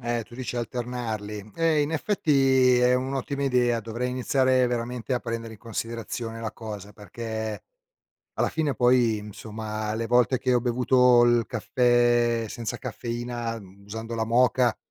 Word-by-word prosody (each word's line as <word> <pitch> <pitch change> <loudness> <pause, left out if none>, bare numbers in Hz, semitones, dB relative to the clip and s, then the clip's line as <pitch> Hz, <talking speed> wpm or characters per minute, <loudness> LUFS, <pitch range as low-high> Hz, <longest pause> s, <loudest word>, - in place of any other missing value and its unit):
Eh, 120 -1 -1
tu 120 - -15
dici 125 0 -5
alternarli? 110 -4 -4
Eh, 165 -2 +2
in 145 - -2
effetti, 135 - +3
è 125 0 +4
un'ottima 135 +2 -2
idea, 125 -3 +2
dovrei 115 +3 -3
iniziare 130 0 +2
veramente 120 +1 -3
a 125 - +2
prendere 115 -1 -5
in 110 - -12
considerazione 115 0 -5
la 110 -1 -3
cosa, 105 -2 -8
perché, 110 +1 -5 0.7
alla - - 0
fine, 155 -4 -1
poi, 120 -3 +3
insomma, 110 +1 -5
le 115 +1 -2
volte 125 +2 +3
che 130 0 0
ho 120 - +3
bevuto 125 0 +4
il 120 -1 +3
caffè 120 -1 +2
senza 120 +2 -5
caffeina, 120 -1 -4
mhmm, 100 0 -16
usando 110 +3 -6
la 115 -1 0
moka, 120 +1 +3
120 Hz, 150 wpm, -26 LUFS, 115-125 Hz, 0.7 s, è